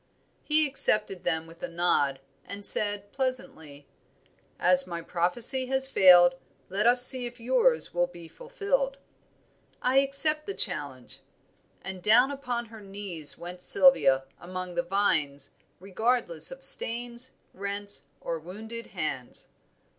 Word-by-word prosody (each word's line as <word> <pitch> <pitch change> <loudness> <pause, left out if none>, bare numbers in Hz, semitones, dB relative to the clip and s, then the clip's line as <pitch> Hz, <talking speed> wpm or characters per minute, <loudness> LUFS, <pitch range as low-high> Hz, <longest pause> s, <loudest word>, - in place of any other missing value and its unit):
He 310 0 +2
accepted 210 -8 +1
them 160 -2 -2
with 165 +1 -17
a - - -5
nod, 170 -6 -1 0.2
and 200 0 -7
said 205 -1 0
pleasantly 160 - -6 0.7
"As 180 0 +4
my 170 -1 -7
prophecy 225 +11 +1
has 265 0 +4
failed, 180 -7 +5 0.4
let 200 +4 -1
us 245 +1 +8
see 255 -1 +2
if 240 +1 -13
yours 475 - 0
will 175 0 0
be 175 -1 -14
fulfilled." - - -4 0.8
"I 255 +1 0
accept 290 +3 +3
the 400 - -4
challenge." - - -4 0.6
And 190 -1 -8
down 245 +8 +3
upon 245 -4 -5
her 220 -1 -14
knees 195 -6 +1
went 180 +1 -10
Sylvia 160 - +3 0.2
among 185 0 -8
the 175 - -1
vines, 155 -7 -1 0.3
regardless 235 - -2
of - - -10
stains, 240 - +2 0.2
rents, 200 +1 -5 0.2
or 165 -1 -5
wounded 220 +8 -9
hands. - - -7
205 Hz, 130 wpm, -26 LUFS, 175-255 Hz, 0.8 s, us